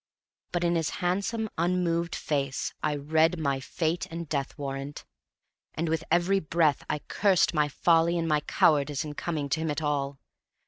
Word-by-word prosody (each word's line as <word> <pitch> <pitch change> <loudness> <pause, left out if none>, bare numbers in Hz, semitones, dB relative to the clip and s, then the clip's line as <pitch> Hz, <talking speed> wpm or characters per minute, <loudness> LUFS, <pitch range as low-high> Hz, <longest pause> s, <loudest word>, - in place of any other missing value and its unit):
But 175 0 -1
in 170 0 +2
his 165 -2 0 0.2
handsome, 200 +5 0
unmoved 170 -1 +1
face 140 -3 -2
I 150 -1 0
read 160 +4 +2
my 140 -4 0
fate 165 +5 -2
and 165 0 -6
death 140 -2 -3
warrant; 140 0 -5 0.7
and 165 +1 -1
with 160 0 0
every 175 +4 +3
breath 160 -3 +1
I 150 - -1
cursed 195 -4 +3
my 150 -2 +2
folly 165 +3 +3
and 165 -1 -1
my 150 -1 +3
cowardice 145 0 +2
in 150 - -5
coming 150 -2 -3
to 160 - 0
him 160 0 -1
at 150 +1 -2
all. 140 -2 -1
160 Hz, 170 wpm, -28 LUFS, 145-170 Hz, 0.7 s, every